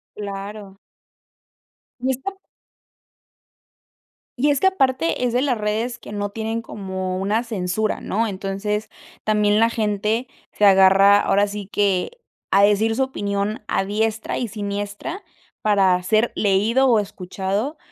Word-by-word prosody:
Claro. 200 -1 -7 1.2
Y 260 +2 0
está 385 +10 -5 2.0
Y 290 +2 +3
es 280 - +1
que 380 - +4
aparte 270 -5 +1
es 240 - -1
de 250 - +2
las 260 -4 +1
redes 220 +3 -2
que 230 - -11
no 205 0 -3
tienen 225 +2 -3
como 190 -3 -4
una 210 +5 0
censura, 215 -1 -2
¿no? 225 +3 -1
Entonces 200 +2 -3 0.3
también 210 0 +2
la 230 +1 +3
gente 215 +3 -1 0.2
se - - -4
agarra, 195 +1 +7
ahora 205 0 +2
sí 205 -1 -6
que 205 - 0 0.3
a 195 +1 +5
decir 210 +2 +3
su 265 - 0
opinión 205 -4 -2
a 195 - 0
diestra 220 +2 -1
y 245 - -2
siniestra 205 - -5 0.4
para 190 -4 +3
ser 215 +5 +2
leído 215 +7 +2
o 230 -4 +4
escuchado, 200 - -3
210 Hz, 135 wpm, -22 LUFS, 200-230 Hz, 2.0 s, agarra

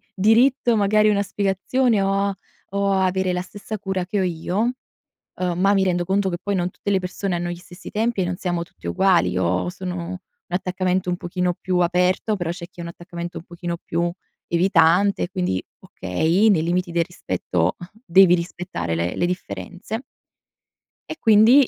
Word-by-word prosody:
diritto 235 +4 +4
magari 210 +1 +4
una 205 -1 +3
spiegazione, 205 +4 +1
o 195 0 +1
a 200 0 0 0.4
o 200 0 +1
a 190 -1 +2
avere 185 0 0
la 180 0 -1
stessa 205 +3 -7
cura 190 -2 -2
che 205 +1 -1
ho - - +2
io, 175 +1 -2 0.8
uhm, 180 -1 -1
ma 195 +2 +4
mi 195 - +3
rendo 175 -2 +1
conto 195 +2 +1
che 175 - -2
poi 200 +1 -2
non 180 -1 0
tutte 200 - -3
le 190 - +2
persone 185 +1 -3
hanno 175 0 -2
gli 175 - -4
stessi 175 +1 -11
tempi 225 0 0
e - - +2
non 180 0 -2
siamo 175 -2 -2
tutti 170 - -12
uguali. 175 - +3
Io 90 - 0
sono 180 0 -5
un 185 - -4 0.3
attaccamento 185 0 -1
un 175 - 0
pochino 180 0 -1
più 185 -1 0
aperto, 180 +4 +2
però 175 -3 -2
c'è 170 0 -6
chi 185 - -33
ha 170 - -5
un 170 - -5
attaccamento 175 0 -7
un - - -10
pochino 175 0 -5
più 170 0 -1 0.4
evitante, 175 +2 +3
quindi 180 - -1 0.2
okay, 160 - +1
nei 185 -7 +4
limiti 175 +1 0
del 170 0 +2
rispetto 90 - -1 0.3
devi 180 -1 +6
rispettare 170 - -4
le 85 +2 -1
le 175 - +1
differenze 185 +4 -5 1.1
E 315 - -4
quindi 225 +5 +6
180 Hz, 185 wpm, -22 LUFS, 175-200 Hz, 1.1 s, devi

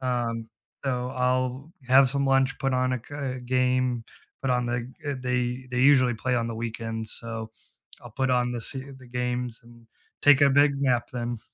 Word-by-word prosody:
Um, 120 -3 -2 0.4
so 125 -2 -1
I'll 130 +3 0 0.2
have 130 0 +6
some 140 0 0
lunch, 135 0 +2
put 135 -1 0
on 130 0 +1
a 125 - -4
c 140 -3 -4
game, 125 -1 +1 0.4
put 135 - 0
on 125 -1 +1
the, 120 +1 -3 0.2
uh, 145 - 0
they 125 0 -1
they 125 - -2
usually 130 -2 +5
play 125 +3 -1
on 115 -1 0
the 115 - -4
weekends, 115 -1 -3
so 115 -1 -4 0.5
I'll 120 - -10
put 130 +4 -1
on 125 -1 +2
the 120 - -3
se 135 +4 -3 0.2
the 130 - -14
games 125 -1 -3
and 115 0 -18 0.4
take 145 -1 +7
a 140 - +6
big 145 +1 +5
nap 120 -3 +1
then. 120 -1 -3
125 Hz, 185 wpm, -26 LUFS, 120-130 Hz, 0.5 s, take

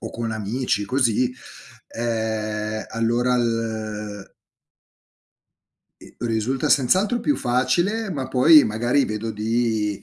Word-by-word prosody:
o - - -6
con 115 -1 -4
amici 110 0 -2
così, 125 +1 +1 0.6
ehm, 110 -2 -3
allora 120 +2 +1
il 110 -3 -3 1.7
ehm, - - -15
risulta 115 +4 -1
senz'altro 190 - +2
più 290 - +1
facile, 175 - 0
ma 135 -5 -4
poi 150 +4 +6
magari 120 +6 +1
vedo 110 +1 -4
di, 110 -1 -1
115 Hz, 100 wpm, -22 LUFS, 110-130 Hz, 1.7 s, poi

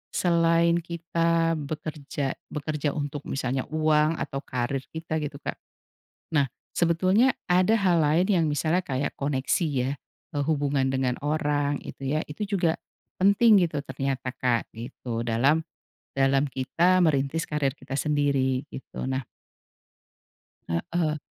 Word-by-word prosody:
selain 170 -1 +3
kita 165 0 0
bekerja 145 -2 -4 0.2
bekerja 150 -1 -2
untuk 145 -1 -4
misalnya 130 -1 -2
uang 155 0 +3
atau 135 - -3
karir 130 +1 -2
kita 160 -1 -3
gitu 145 -1 -4
Kak, - - -4 0.8
nah 140 -2 +4 0.3
sebetulnya 185 +9 +4 0.2
ada 185 +5 +4
hal 180 -4 +3
lain 160 +5 +3
yang 170 -5 +3
misalnya 155 +5 +1
kayak 135 +1 -2
koneksi 140 +4 0
ya, 130 -1 0 0.4
eee, 145 -1 0
hubungan 140 -3 +1
dengan 130 -2 +1
orang 145 -1 0
itu 135 +2 -3
ya. - - 0
Itu 150 +8 -4
juga, 175 -5 +1 0.4
penting 200 0 +6
gitu 150 -2 -3
ternyata 135 0 -2
Kak, 125 -3 0
gitu, 115 -1 -5
dalam, 135 +8 +3 0.5
dalam 135 +1 +3
kita 170 +8 +2
merintis 150 +1 +1
karir 150 -3 +1
kita 135 - -6
sendiri, 140 -3 +1
gitu. 135 - -7
Nah 130 0 -1 1.5
Heeh. 155 - 0
150 Hz, 125 wpm, -26 LUFS, 135-165 Hz, 1.5 s, penting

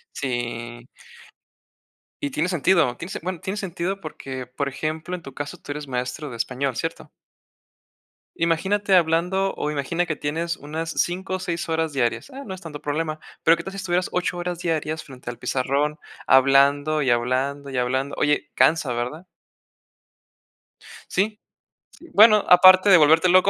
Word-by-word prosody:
Sí. 120 -2 -4 1.4
Y 140 - -1
tiene 155 +6 -1
sentido, 170 -7 +2
tiene 180 - -8
sen - - -5
bueno, 185 -1 -4
tiene 190 +1 -4
sentido 190 0 -3
porque, 135 -6 -7
por 135 +3 -3
ejemplo, 155 +5 -4
en 180 - -6
tu 135 -3 -11
caso 145 +1 -6
tú 145 - -7
eres 145 -1 -7
maestro 125 +3 -4
de 120 - -7
español, 130 +2 -2
¿cierto? - - -4 1.3
Imagínate 190 +4 +2
hablando, 180 +3 +1
o 150 - -2
imagina 150 +4 -1
que 155 -3 -3
tienes 165 +3 -2
unas 160 +3 -5
5 185 +3 -1
o - - -6
6 170 -2 -4
horas 160 -1 -1
diarias. 130 - -1
Ah, 275 - -7
no 190 - -7
es 185 - -8
tanto 150 -4 -9
problema, 155 +1 -2 0.2
pero 165 - +6
¿qué - - -6
tal - - -7
si - - -8
estuvieras 180 -2 -1
8 180 0 -1
horas 175 -1 -3
diarias 160 -2 -2
frente 130 -4 -9
al 120 - -9
pizarrón 140 +5 -1 0.3
hablando, 140 +3 +4
y 130 - +1
hablando, 130 +4 0
y 135 - -5
hablando? 130 +3 -1
Oye, 150 0 +1
cansa, 155 -5 +3
¿verdad? 125 +9 -4 1.8
Sí. 210 +3 0 0.5
Sí, 340 - -16
bueno, 215 0 +7
aparte 185 +2 +8
de 180 - +9
volverte 160 +3 +5
loco, 185 +2 +5
155 Hz, 165 wpm, -23 LUFS, 135-180 Hz, 1.8 s, de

